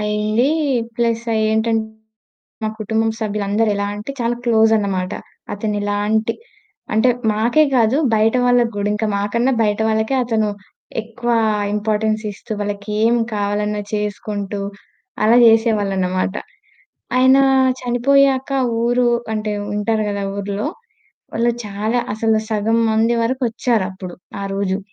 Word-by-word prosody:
అయింది. 210 +4 +1 0.5
ప్లస్ 230 -1 0
అఏంటంటే 220 +1 +1 0.8
మా 215 - 0
కుటుంబం 220 +1 0
సభ్యులందరూ 210 0 0
ఎలా 200 0 -1
అంటే 210 +6 -6
చాలా 235 0 0
క్లోజన్నమాట. 220 -5 +2 0.4
అతను 210 +1 -2
ఎలాంటి 210 +2 0 0.6
అంటే 220 +4 +4 0.2
మాకే 235 +8 +3
కాదు 230 +2 +3 0.2
బయట 220 +2 +3
వాళ్ళకి 245 -1 +3
కూడా. 205 0 -1
ఇంక 215 +1 -2
మాకన్నా 235 +6 0
బయట 210 0 0
వాళ్ళకే 220 +3 0
అతను 220 -3 0 0.5
ఎక్కువ 230 +2 -4 0.4
ఇంపార్టెన్స్ 215 +1 0
ఇస్తూ 210 - -9
వాళ్ళకేం 210 +3 0 0.2
కావాలన్నా 210 0 -1
చేసుకుంటూ, 205 -1 -3 0.6
అలా 225 +3 +5
జేసేవాళ్ళనమాట. 200 -5 +2 0.8
ఆయన 260 +1 +6 0.4
చనిపోయాక 270 +2 +2 0.3
ఊరు 245 +1 +2 0.3
అంటే 215 0 -2 0.2
వుంటారు 210 +1 0
గదా! 200 -1 -3
ఆ - - -5
ఊర్లో, 200 +5 -3 0.7
వాళ్ళు 235 +1 +2
చాలా 210 +4 -1 0.2
అసలు 220 0 +2
సగం 225 +1 +1
మంది 225 +2 +2
వరకు 260 +3 -1
ఒచ్చారప్పుడు 190 -7 -2 0.3
ఆ - - -3
రోజు. 195 0 -1
220 Hz, 115 wpm, -19 LUFS, 205-230 Hz, 0.8 s, ఆయన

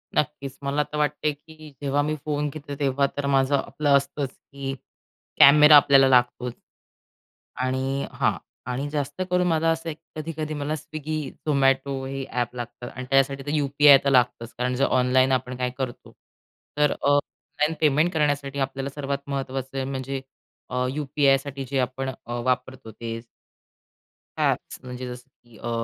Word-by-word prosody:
नक्कीच, 140 -2 -2
मला 140 +2 +1
तर 150 - -7
वाटते 150 0 0
की 155 +1 -14
जेव्हा 140 0 +1
मी 150 +1 -1
फोन 150 -1 -1
घेतो, 145 0 -7
तेव्हा 140 0 +2
तर 145 - -1
माझं, 135 0 +3
आपलं 145 0 +2
असतंच 140 0 -3
की 135 0 -7 0.7
कॅमेरा 150 +2 +9
आपल्याला 135 -1 +6
लागतोच. 125 -1 +2 1.0
आणि 130 +2 -1
हां, - - +1 0.3
आणि 135 +3 -2
जास्त 145 +3 -3
करून 180 0 +2
मला 165 -1 +2
असं 165 0 -4 0.2
कधी-कधी 155 0 -4
मला 145 +1 -2
Swiggy, 155 0 -5 0.3
Zomato 135 -1 +2
हे 135 0 -4
ॲप 120 -1 -2
लागतात. 120 0 -7
आणि 130 - -7
त्याच्यासाठी 135 0 +2
तर - - -2
यू.पी.आय. 140 0 +6
तर 140 - +3
लागतंच. 120 -2 +2
कारण 125 +1 0
जर 135 - +2
ऑनलाईन 130 +1 +3
आपण 125 -1 -1
काय 125 0 -1
करतो, 130 -3 -5 0.7
तर 150 -1 +4
अ, - - -2
ऑनलाईन 145 +2 0
पेमेंट 155 +3 +3
करण्यासाठी 145 -2 0
आपल्याला 135 0 -2
सर्वात 140 -1 -2
महत्त्वाचं 135 -1 -3
म्हणजे 135 0 -3 0.5
अ, 125 0 0
यू-पी-आय. 140 -1 +2
साठी 140 -1 -6
जे 140 - 0
अ, - - +3
आपण 130 +1 -3 0.2
वापरतो 125 0 -2
ते 115 +1 -6 1.2
ॲप्स - - 0
म्हणजे 125 0 -6
जसं 125 +1 -9
की, 120 -2 -18
अ, 120 - -5
140 Hz, 155 wpm, -25 LUFS, 130-145 Hz, 1.2 s, कॅमेरा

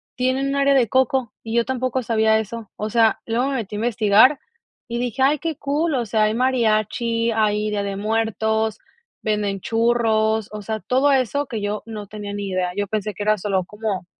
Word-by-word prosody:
tienen 260 +2 0
un 275 - -1
área 280 0 +4
de 245 -4 +4
Coco 260 -1 +1
y 225 0 -4
yo 235 0 +3
tampoco 255 0 -1
sabía 220 -1 +3
eso, 220 0 -6
o 215 - -3
sea, 225 -1 +3
luego 235 +4 0
me 275 - -2
metí 215 -5 -4
investigar 225 +4 +4 0.5
y 235 0 -3
dije: 250 +2 -1
"Ay 290 +2 +3
qué 325 +1 -3
cool", 295 +2 0
o 245 -2 0
sea, 215 0 +1
hay 215 +1 +1
mariachi, 230 -1 +1
hay 215 -1 +1
Día 205 -1 -1
de 200 -1 -3
Muertos, 220 0 0 0.5
venden 210 -2 -1
churros, 225 -2 +1
o 210 0 -6
sea, 220 +2 -3
todo 265 +5 +2
eso 270 +2 +1
que 225 - -4
yo 205 +1 -2
no 215 -2 -6
tenía 205 0 -7
ni 200 -1 -4
idea, 185 -1 -1
yo 205 - 0
pensé 210 0 -2
que 205 - -4
era 215 0 +2
solo 190 -2 -1
como 210 -2 -4
225 Hz, 200 wpm, -22 LUFS, 210-250 Hz, 0.5 s, área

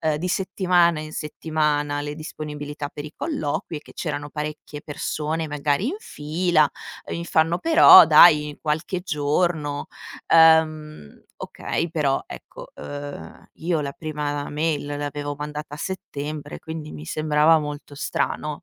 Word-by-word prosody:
ehm, 155 -1 +1
di 175 +4 -3
settimana 180 -3 +2
in 155 0 -7
settimana 150 -2 -1
le 145 0 -5
disponibilità 150 -2 -6
per 145 - -8
i 155 - -9
colloqui 160 - -3
e - - -16
che - - -16
c'erano 145 -3 -4
parecchie 150 0 -6
persone 155 +1 -3
magari 150 - 0
in 360 - -3
fila. 155 - +1 0.4
Mi 170 - -4
fanno: 165 +1 +2
"Però 330 - +9
dai, 150 -3 +6
qualche 160 +4 -2
giorno". 150 -2 -1 0.5
Ehm, 155 - +3 0.2
ok, 170 - -3
però 150 -4 0
ecco, - - -10
ehm, 145 0 -8
io 165 -1 -1
la 140 -1 -3
prima 145 -1 -4
mail 150 -1 -1
l'avevo 145 0 -4
mandata 150 0 -6
a - - -10
settembre, 150 -4 -6
quindi 160 -1 -7
mi 75 - -9
sembrava 155 - +3
molto 150 -1 -7
strano. 150 +2 -3
150 Hz, 135 wpm, -23 LUFS, 145-160 Hz, 0.5 s, Però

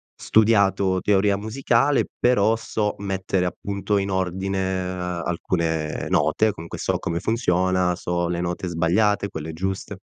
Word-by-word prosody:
studiato 100 -4 +3
teoria 100 0 +3
musicale, 120 +5 +1
però 115 -2 +3
so 110 -2 -2
mettere, 95 -2 -1
appunto, 100 +3 -2
in 100 0 -1
ordine 95 +1 -1 0.6
alcune 85 -3 -2
note. 110 0 +2
Comunque, 85 -1 -8
so - - -1
come 85 0 -2
funziona, 95 -4 +1
so 85 -1 -2
le 85 0 -2
note 90 +1 -3
sbagliate, 100 +5 +1
quelle 80 +1 -6
giuste. 95 +3 -4
95 Hz, 125 wpm, -23 LUFS, 90-105 Hz, 0.6 s, studiato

